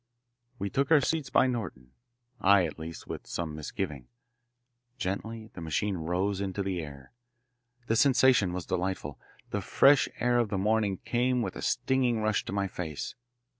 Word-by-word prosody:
We 100 -2 -3
took 140 0 +1
our 160 -2 +7
seats 150 -2 -1
by - - +4
Norton, 105 - -4 0.5
I, 100 -1 +5
at 80 - -6
least, 80 +1 -7
with - - -7
some 80 -3 -3
misgiving. 75 -3 -5 0.9
Gently 110 +1 -4
the 85 - -8
machine 85 +5 -1
rose 90 +4 -1
into 100 0 -2
the 95 -2 -2
air. 70 -4 -10 0.7
The 115 - +1
sensation 130 -6 +4
was 90 -1 -4
delightful. 90 -7 -3 0.3
The - - -1
fresh 140 0 +5
air 120 0 +3
of 115 -3 +1
the 100 - -1
morning 105 -1 +1
came 125 0 +1
with - - -4
a - - -6
stinging 125 -3 +1
rush 110 -1 +1
to - - -5
my 100 0 0
face. 80 -6 -5
100 Hz, 165 wpm, -29 LUFS, 85-120 Hz, 0.9 s, our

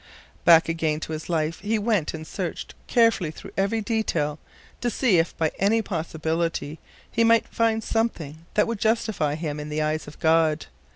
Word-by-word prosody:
Back 165 -1 +7
again 160 -2 0
to - - -5
his 155 +2 -6
life 160 -1 0
he 215 +3 0
went 210 -8 0
and 155 0 -7
searched 175 0 -5
carefully 230 -8 +3
through 155 - -10
every 200 +3 +1
detail 170 -9 -1 0.4
to 240 - 0
see 225 -7 +3
if 165 - -1
by 160 -1 +1
any 220 +3 +3
possibility 160 -3 -2 0.3
he 230 - +2
might 230 0 +4
find 225 -1 +1
something 170 -10 -2
that 210 - +4
would 230 -2 -3
justify 220 -9 +1
him 150 -2 -4
in 150 0 -6
the 155 0 -1
eyes 155 0 -2
of 150 - -11
God. 160 -1 +3
165 Hz, 175 wpm, -25 LUFS, 155-220 Hz, 0.4 s, Back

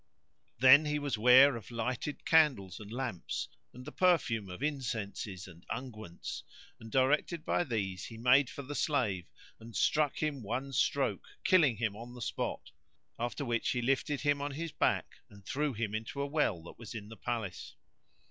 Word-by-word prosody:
Then 130 +4 +8 0.2
was 145 -1 -3
he 105 - -1
ware 130 +3 +8
of 115 - -8
lighted 125 +5 -3
candles 135 - +3
and 105 -1 -10
lamps, 120 -8 -3 0.2
and 125 0 -11
the 150 - -7
perfume 135 - +2
of 90 +9 -7
incenses 110 -9 -3
and 85 -1 -14
unguents, 110 -7 -6 0.4
and 115 0 -11
directed 150 +5 +2
by - - +2
these, 100 - -3
he 115 - -9
made 125 +3 +5
for 140 - -7
the 145 +2 -6
slave 115 - 0 0.3
and 115 -1 -12
struck 150 +6 +2
him 150 -4 -2
one 125 +6 -3
stroke - - +1 0.2
killing 150 - +4
him 110 -2 -1
on 120 +3 -9
the - - -9
spot: - - -3 0.5
after 120 +4 -2
which 115 -2 0
he 125 - 0
lifted 135 +3 0
him 145 -1 +1
on 145 0 -3
his 165 +3 -4
back - - 0
and 100 -1 -16
threw 150 +1 -1
him 110 -3 -3
into 110 +6 -4
a 140 - 0
well 140 - 0
that 85 - -12
was 115 0 -8
in 105 -2 -7
the 115 - -9
palace. 110 -6 -4
125 Hz, 175 wpm, -32 LUFS, 110-140 Hz, 0.5 s, Then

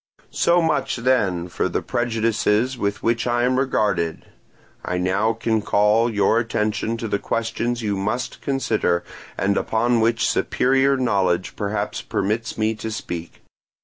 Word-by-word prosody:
"So 175 0 +3
much 135 -4 0
then 110 -9 +1
for 85 - -2
the - - -2
prejudices 115 +1 0
with 100 -4 -2
which 115 +1 +1
I 120 0 +1
am 130 +1 +2
regarded: 100 - 0 0.6
I 90 - -2
now 95 +5 +1
can 110 -1 0
call 105 +3 +3
your 110 +2 +3
attention 115 0 -1
to 115 - -4
the 100 -1 -1
questions 115 +1 -2
you 105 -2 0
must 110 +6 -3
consider, 110 -10 0 0.3
and 100 +1 +1
upon 115 +2 +1
which 115 +1 +2
superior 135 +1 +2
knowledge 95 -8 0
perhaps 100 0 -2
permits 110 +3 -2
me 110 0 +1
to 110 +1 -6
speak. 85 -6 -6
110 Hz, 145 wpm, -22 LUFS, 100-120 Hz, 0.6 s, So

